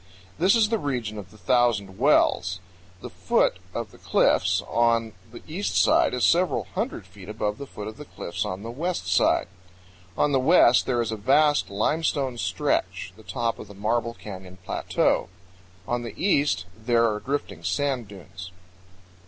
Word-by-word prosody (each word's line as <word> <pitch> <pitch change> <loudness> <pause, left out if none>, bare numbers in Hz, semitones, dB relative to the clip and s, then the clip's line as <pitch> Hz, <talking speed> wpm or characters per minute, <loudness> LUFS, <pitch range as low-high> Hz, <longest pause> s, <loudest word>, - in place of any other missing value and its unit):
This 185 +6 +4
is 220 -2 +3
the 225 -1 0
region 120 - -3
of 95 -3 -10
the 110 - -17
Thousand 105 -2 +1
Wells. 90 +2 +3 0.4
The - - -8
foot - - +1
of - - -5
the - - -17
cliffs - - +2
on 115 -1 +1 0.2
the 120 - -11
east 185 +6 -2
side - - +4
is 125 - -2
several 175 -4 +2
hundred - - -3
feet - - -13
above 105 0 -3
the 140 - -7
foot 105 -4 -8
of 110 - -8
the 150 - -9
cliffs 85 - -5
on 95 +2 -5
the 115 - -5
west 170 +8 -3
side. - - +2 0.7
On 150 - +2
the 135 - +3
west 130 -3 +5
there 120 -2 +1
is 115 - -4
a 110 - -3
vast 145 +7 +3
limestone 135 +3 0
stretch, - - -1
the 110 - -15
top 115 +1 -3
of - - -9
the 100 - -13
Marble 115 +3 -1
Canyon 95 -2 -10
Plateau; - - 0 0.6
on 120 0 -1
the 115 - -7
east 145 - +2
there 115 +1 +2
are 105 -1 -1
drifting 135 - -4
sand 125 +6 -1
dunes. 95 -2 -10
120 Hz, 170 wpm, -25 LUFS, 105-140 Hz, 0.7 s, west